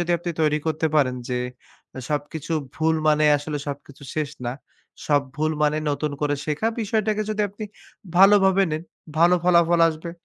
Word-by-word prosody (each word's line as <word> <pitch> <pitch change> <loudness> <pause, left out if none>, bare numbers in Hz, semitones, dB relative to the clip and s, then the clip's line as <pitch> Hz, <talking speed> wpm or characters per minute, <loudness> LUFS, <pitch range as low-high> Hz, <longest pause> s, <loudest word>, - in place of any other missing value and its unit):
যদি 175 0 -2
আপনি 175 +1 -4
তৈরি 150 0 +2
করতে 160 0 0
পারেন। 130 -4 +2
যে 125 -1 -1 0.7
সবকিছু 150 +2 -3 0.2
ভুল 160 0 +2
মানে 150 0 +4
আসলে 145 0 -4
সবকিছু 140 0 -8
শেষ 155 -2 -2 0.2
না। 120 - -1 0.5
সব 145 -2 +3
ভুল 155 +1 0
মানে 150 +1 +2
নতুন 150 +1 -2
করে 145 -1 +1
শেখা। 150 +8 -1 0.2
বিষয়টাকে 215 0 0
যদি 210 0 0
আপনি 205 +3 -8 0.5
ভালোভাবে 195 0 +6
নেন 155 +1 -3 0.4
ভালো 175 +2 +6
ফলাফল 170 -1 +4
আসবে। 165 +1 -5
155 Hz, 160 wpm, -23 LUFS, 150-180 Hz, 0.7 s, ভালোভাবে